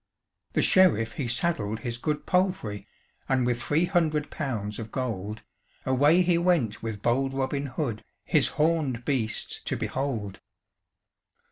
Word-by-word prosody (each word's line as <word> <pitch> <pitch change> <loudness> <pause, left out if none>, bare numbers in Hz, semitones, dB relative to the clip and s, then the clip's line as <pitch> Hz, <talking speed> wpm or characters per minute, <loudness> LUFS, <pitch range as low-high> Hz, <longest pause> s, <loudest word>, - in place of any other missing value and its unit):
The - - +2
Sheriff 115 - +4
he 135 -1 -3
saddled 120 -5 0
his 120 -3 -2
good 150 +2 -2
palfrey, 180 - 0 0.4
And 130 -2 +2
with 120 0 0
three 155 +7 +2
hundred 160 -5 0
pounds 110 -9 -3
of 110 -1 -7
gold, 110 -4 -4 0.4
Away 145 +7 +4
he 175 -1 +3
went 170 - +1
with 110 -3 -5
bold 135 +3 +1
Robin 135 +1 -1
Hood, 130 -5 -3 0.2
His - - +3
horned 150 -7 +1
beasts 120 -6 -1
to - - -1
behold. 115 -8 -3
130 Hz, 135 wpm, -27 LUFS, 115-155 Hz, 0.4 s, Sheriff